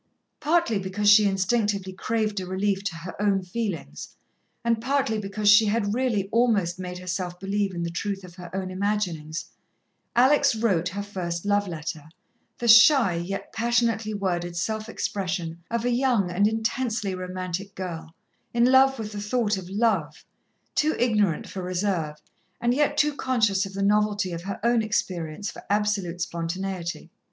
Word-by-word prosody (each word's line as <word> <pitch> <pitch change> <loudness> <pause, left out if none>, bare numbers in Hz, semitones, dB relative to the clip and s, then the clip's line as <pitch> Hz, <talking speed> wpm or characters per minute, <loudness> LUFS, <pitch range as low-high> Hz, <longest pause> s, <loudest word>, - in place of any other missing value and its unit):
Partly 315 -9 +2
because 190 +2 -2
she 210 0 +7
instinctively 195 0 0
craved 215 +1 -1
a 185 - -5
relief 195 +1 -1
to 195 - -2
her 170 +2 -7
own 200 -2 +2
feelings, 180 - -5 0.5
and 230 -1 +1
partly 260 -4 0
because 205 +1 -3
she 205 +1 +7
had 205 -1 0
really 230 -6 0
almost 210 -7 +2
made 180 -1 -5
herself 180 0 -4
believe 195 0 -1
in 170 - -2
the 170 - -3
truth 195 +3 -3
of 180 -1 -11
her 180 -1 -10
own 190 -1 -3
imaginings, 185 -5 -2 0.6
Alex 275 +1 +5
wrote 190 -6 +1
her 200 +2 -4
first 180 -3 -4
love 205 0 +2
letter, 160 -2 -6 0.5
the 240 - -3
shy, 235 - +7
yet 175 +4 -4
passionately 230 -2 +1
worded 175 -4 -2
self 215 +5 -2
expression 175 -6 -3
of 235 0 -1
a 245 - +2
young 240 -7 +2
and 200 +4 +3
intensely 225 -2 -1
romantic 185 +1 -5
girl, 165 -3 -6 0.4
in 235 0 +4
love 265 +1 +5
with 215 -2 -5
the 205 -1 -5
thought 210 0 0
of 185 -2 -7
Love, 200 -6 0 0.5
too 310 +1 +2
ignorant 210 -9 +1
for 190 - -6
reserve, 180 -4 -1 0.4
and 240 +1 +2
yet 290 +1 +1
too 300 -1 +2
conscious 215 -8 +1
of 195 - -11
the 195 0 -2
novelty 205 -1 +2
of 170 -1 -4
her 195 0 -4
own 235 0 +3
experience 185 -4 -2
for - - -11
absolute 205 -4 0
spontaneity. 175 +1 -4
200 Hz, 160 wpm, -25 LUFS, 180-225 Hz, 0.6 s, she